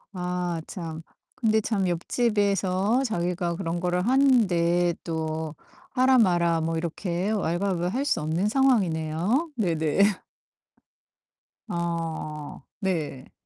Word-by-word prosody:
아 180 Hz, -2 st, -2 dB
참. 165 Hz, -3 st, -6 dB, 0.3 s
근데 220 Hz, -2 st, +2 dB
참 200 Hz, -4 st, 0 dB
옆집에서 200 Hz, +3 st, +1 dB
자기가 175 Hz, -5 st, -1 dB
그런 170 Hz, -2 st, -3 dB
거를 180 Hz, +2 st, 0 dB
하는데 180 Hz, -11 st, +3 dB
또 160 Hz, -1 st, -3 dB, 0.4 s
하라 255 Hz, 0 st, +4 dB
마라 170 Hz, -5 st, +3 dB
뭐 165 Hz, +1 st, -1 dB
이렇게 175 Hz, +3 st, -2 dB
왈가왈부할 190 Hz, +4 st, 0 dB
수 280 Hz, -, +1 dB
없는 165 Hz, +7 st, 0 dB
상황이네요. 210 Hz, -, +1 dB
네네. 165 Hz, -5 st, 0 dB, 1.7 s
아 165 Hz, -4 st, -4 dB, 0.2 s
네. 155 Hz, -8 st, -3 dB
175 Hz, 200 characters per minute, -26 LUFS, 165-210 Hz, 1.7 s, 하라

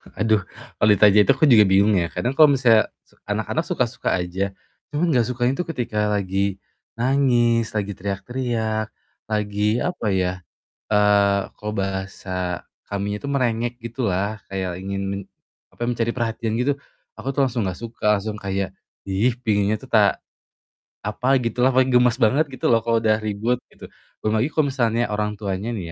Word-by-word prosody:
Aduh, 110 Hz, -1 st, +2 dB, 0.4 s
kalau 105 Hz, -, +3 dB
ditanya 105 Hz, +1 st, +6 dB
itu -, -, +5 dB
aku 140 Hz, +3 st, +2 dB
juga 110 Hz, -4 st, +8 dB
bingung 100 Hz, +2 st, +4 dB
ya. 85 Hz, -2 st, +1 dB
Kadang 125 Hz, +9 st, -1 dB
kalau 155 Hz, -2 st, +8 dB
misalnya 115 Hz, -5 st, +4 dB, 0.2 s
se -, -, -27 dB
anak-anak -, -, -1 dB
suka-suka -, -, -1 dB
aja, 95 Hz, +2 st, -2 dB, 0.4 s
cuma 155 Hz, +4 st, 0 dB
nggak 125 Hz, -6 st, +3 dB
sukanya 120 Hz, +1 st, +1 dB
itu 180 Hz, -, -2 dB
ketika 120 Hz, -7 st, -3 dB
lagi 100 Hz, -1 st, -1 dB, 0.4 s
nangis, 120 Hz, -3 st, +2 dB
teriak-teriak, 110 Hz, +2 st, -2 dB, 0.4 s
lagi 105 Hz, +1 st, 0 dB
apa 180 Hz, -9 st, -3 dB
ya, 90 Hz, -1 st, +1 dB, 0.6 s
eee, 100 Hz, -1 st, +4 dB, 0.2 s
kalau 105 Hz, 0 st, -5 dB
bahasa 95 Hz, -2 st, -3 dB, 0.2 s
kaminya 100 Hz, +1 st, -3 dB
itu 140 Hz, -, -6 dB
merengek 120 Hz, -4 st, 0 dB
gitulah, 105 Hz, -3 st, -2 dB
kayak 95 Hz, -2 st, -3 dB
ingin 100 Hz, +1 st, -4 dB
men 100 Hz, 0 st, -3 dB, 0.5 s
apa, -, -, -9 dB
mencari 120 Hz, -1 st, 0 dB
perhatian 115 Hz, -1 st, -2 dB
gitu. 130 Hz, +4 st, +1 dB, 0.5 s
Aku -, -, -5 dB
tuh 140 Hz, -, +4 dB
langsung 120 Hz, -5 st, -1 dB
nggak 90 Hz, -, -4 dB
suka, 115 Hz, 0 st, -6 dB
langsung 105 Hz, +1 st, -4 dB
kayak, 95 Hz, -1 st, -2 dB, 0.3 s
"Ih, 100 Hz, +6 st, +1 dB
penginnya 105 Hz, -2 st, +1 dB
tuh -, -, -14 dB
ta -, -, +4 dB, 0.9 s
apa 105 Hz, +5 st, -3 dB, 0.2 s
gitulah." 125 Hz, +3 st, +1 dB
Paling 130 Hz, 0 st, +4 dB
gemas 125 Hz, -1 st, +4 dB
banget 135 Hz, +8 st, +4 dB
gitu 130 Hz, -, -2 dB
loh 115 Hz, -, +5 dB
kalau 115 Hz, -1 st, +2 dB
udah 110 Hz, -1 st, +3 dB
ribut 110 Hz, +3 st, -1 dB
gitu. -, -, -13 dB, 0.3 s
Belum 110 Hz, 0 st, +1 dB
lagi 125 Hz, -, +2 dB
kalau 155 Hz, -3 st, +2 dB
misalnya 120 Hz, -2 st, 0 dB
orang 105 Hz, 0 st, -1 dB
tuanya 100 Hz, +2 st, -3 dB
nih 85 Hz, -6 st, -6 dB
110 Hz, 160 wpm, -22 LUFS, 100-120 Hz, 0.9 s, juga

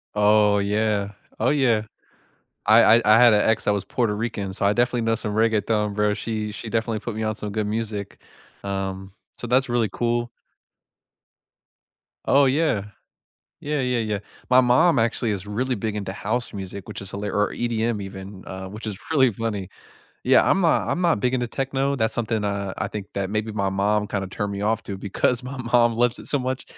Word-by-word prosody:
Oh, 105 Hz, 0 st, +4 dB
yeah. 105 Hz, 0 st, 0 dB, 0.3 s
Oh, 115 Hz, -, +2 dB
yeah. 120 Hz, -7 st, +2 dB, 0.8 s
I 110 Hz, +2 st, +7 dB, 0.2 s
I -, -, -1 dB
I 110 Hz, +1 st, +7 dB
had 120 Hz, -2 st, +7 dB
a 105 Hz, -, +3 dB
ex 110 Hz, -, +1 dB
that 105 Hz, -, +2 dB
was 100 Hz, -1 st, -2 dB
Puerto 110 Hz, -1 st, 0 dB
Rican, 105 Hz, -3 st, -3 dB
so 100 Hz, -, -3 dB
I 100 Hz, -, +4 dB
definitely 120 Hz, +1 st, +1 dB
know 115 Hz, 0 st, +1 dB
some 105 Hz, -2 st, -4 dB
reggaeton, 110 Hz, -1 st, +1 dB
bro, 105 Hz, 0 st, +2 dB
she 110 Hz, -2 st, -4 dB
she 110 Hz, +1 st, -7 dB
definitely 115 Hz, -1 st, -1 dB
put 115 Hz, -3 st, -5 dB
me 110 Hz, -, -2 dB
on 110 Hz, 0 st, -1 dB
some 105 Hz, -1 st, -6 dB
good 105 Hz, 0 st, -2 dB
music, 105 Hz, -2 st, -4 dB, 0.4 s
um, 95 Hz, -1 st, -4 dB, 0.2 s
so 120 Hz, -, -7 dB
that's 130 Hz, +1 st, +2 dB
really 120 Hz, -2 st, +1 dB
cool 120 Hz, 0 st, -1 dB, 2.0 s
Oh, 140 Hz, +1 st, +5 dB
yeah. 130 Hz, -8 st, +1 dB, 0.7 s
Yeah, 150 Hz, 0 st, -2 dB
yeah, 125 Hz, -1 st, 0 dB
yeah. 105 Hz, -2 st, -1 dB, 0.3 s
My 125 Hz, 0 st, +7 dB
mom 140 Hz, +6 st, +4 dB
actually 115 Hz, 0 st, 0 dB
is 100 Hz, -2 st, -4 dB
really 125 Hz, +5 st, -1 dB
big 110 Hz, +1 st, -3 dB
into 100 Hz, -2 st, -4 dB
house 115 Hz, +5 st, -3 dB
music, 95 Hz, -1 st, -7 dB
which -, -, -7 dB
is 95 Hz, -1 st, -9 dB
hila 100 Hz, 0 st, -4 dB
or 105 Hz, 0 st, +1 dB
EDM 115 Hz, -2 st, -1 dB
even, 95 Hz, 0 st, -9 dB
uh, 95 Hz, 0 st, -7 dB
which 105 Hz, +4 st, -9 dB
is 100 Hz, -3 st, -4 dB
really 130 Hz, -6 st, +4 dB
funny, 105 Hz, -3 st, -4 dB, 0.6 s
yeah, -, -, +5 dB
I'm 195 Hz, -, +3 dB
not 165 Hz, -, +2 dB
I'm 180 Hz, -, -1 dB
not 170 Hz, -12 st, +2 dB
big 125 Hz, +2 st, +1 dB
into 125 Hz, -1 st, 0 dB
techno, 135 Hz, +2 st, -1 dB
that's 110 Hz, -3 st, 0 dB
something, 110 Hz, -2 st, -1 dB
uh, 100 Hz, -1 st, -2 dB
I 100 Hz, -, -2 dB
think 100 Hz, -1 st, -6 dB
that 100 Hz, -1 st, -2 dB
maybe 110 Hz, +2 st, -2 dB
my 100 Hz, -2 st, 0 dB
mom 105 Hz, +2 st, +1 dB
kinda 100 Hz, -2 st, -3 dB
turned 100 Hz, +1 st, -3 dB
me 100 Hz, +1 st, -4 dB
off 110 Hz, +1 st, 0 dB
to 100 Hz, -, -5 dB
because 105 Hz, +5 st, 0 dB
my 130 Hz, +1 st, -7 dB
mom 120 Hz, -1 st, +3 dB
loves 120 Hz, 0 st, +1 dB
it -, -, -10 dB
so 145 Hz, -, +1 dB
much, 130 Hz, 0 st, -3 dB
110 Hz, 200 wpm, -23 LUFS, 100-120 Hz, 2.0 s, I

